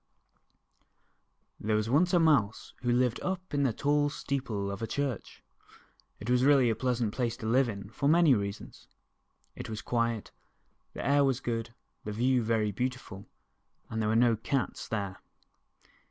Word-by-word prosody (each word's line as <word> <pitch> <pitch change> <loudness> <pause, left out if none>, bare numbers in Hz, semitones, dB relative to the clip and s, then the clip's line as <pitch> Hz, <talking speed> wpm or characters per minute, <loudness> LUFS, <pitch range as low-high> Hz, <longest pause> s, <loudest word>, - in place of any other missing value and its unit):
THERE 110 +1 0
was 110 0 0
once 160 +9 +3
a 175 - +4
Mouse, 140 -11 +2
who 120 -1 0
lived 125 -1 +2
up 185 -2 -4
in 145 - +1
the 135 -3 +2
tall 145 +5 +1
steeple 120 -9 -3
of 100 - -6
a 115 - -2
church. 140 -4 -4 0.8
It 105 - -8
was 125 +1 +3
really 135 -4 +5
a - - -1
pleasant 120 -4 -1
place 120 -3 -2
to 115 - -8
live 125 +3 +3
in 100 -1 -7
for 140 +5 0
many 165 -3 +6
rea 100 -3 0
sons. 100 - -13 0.7
It - - -7
was 110 -1 -5
quiet, 115 -2 -1 0.6
the - - -6
air 140 0 +4
was 135 -2 +1
good, 115 -1 -4 0.3
the 105 - -5
view 125 +3 +2
very 110 -2 0
beautiful, 120 -4 -5 0.6
and 110 0 -2
there 105 - 0
were 110 - +1
no 120 0 +4
cats 130 +4 -2
there. 100 -4 -3
120 Hz, 170 wpm, -29 LUFS, 110-140 Hz, 0.8 s, many